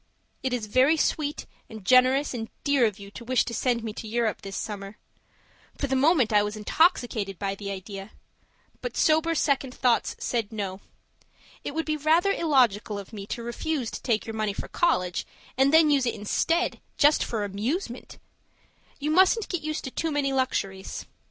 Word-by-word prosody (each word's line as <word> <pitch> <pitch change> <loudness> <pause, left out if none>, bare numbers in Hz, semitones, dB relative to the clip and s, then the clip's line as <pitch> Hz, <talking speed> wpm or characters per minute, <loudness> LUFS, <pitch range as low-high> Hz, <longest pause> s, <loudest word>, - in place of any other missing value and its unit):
It 260 - -1
is 245 -3 -2
very 260 +9 +4
sweet 300 -1 -1 0.2
and 220 -4 -10
generous 255 +4 +4
and 225 -2 -5
dear 280 -5 +4
of 210 -2 -5
you 200 -1 -11
to 235 - -9
wish 255 +1 +2
to 235 - -5
send 235 0 0
me 220 -2 -4
to 220 - -7
Europe 230 0 -1
this 195 0 -6
summer 200 -1 -6 0.8
for - - -1
the 265 -1 0
moment 265 -5 +3
I 210 - +6
was 210 +1 -2
intoxicated 215 - +1
by 195 +1 -2
the 200 0 -6
idea; 195 +1 -7 0.7
but - - -5
sober 320 +1 +3
second 270 -4 0
thoughts 245 -2 +1
said 230 -4 -2
no. 195 -3 -4 0.8
It 285 - -5
would 325 - -1
be 310 -1 -1
rather 320 +6 +3
illogical 245 - +2
of 200 +2 -9
me 200 -2 -7
to 235 - -4
refuse 245 +1 -3
to - - -6
take 225 -4 0
your 225 - -5
money 215 -2 -1
for - - -6
college, 180 - +1 0.3
and 270 +2 +4
then 315 -1 +6
use 275 -3 +3
it - - -1
instead 330 - 0 0.2
just 295 +1 +5
for 220 -3 -2
amusement! 235 - -4 0.8
You 295 +2 -1
mustn't 380 +6 +4
get 355 -3 -2
me 310 - -6
used 310 0 -3
to 265 - -5
too 325 - -2
many 285 -2 0
luxuries. 195 -7 -2
245 Hz, 185 wpm, -26 LUFS, 210-295 Hz, 0.8 s, I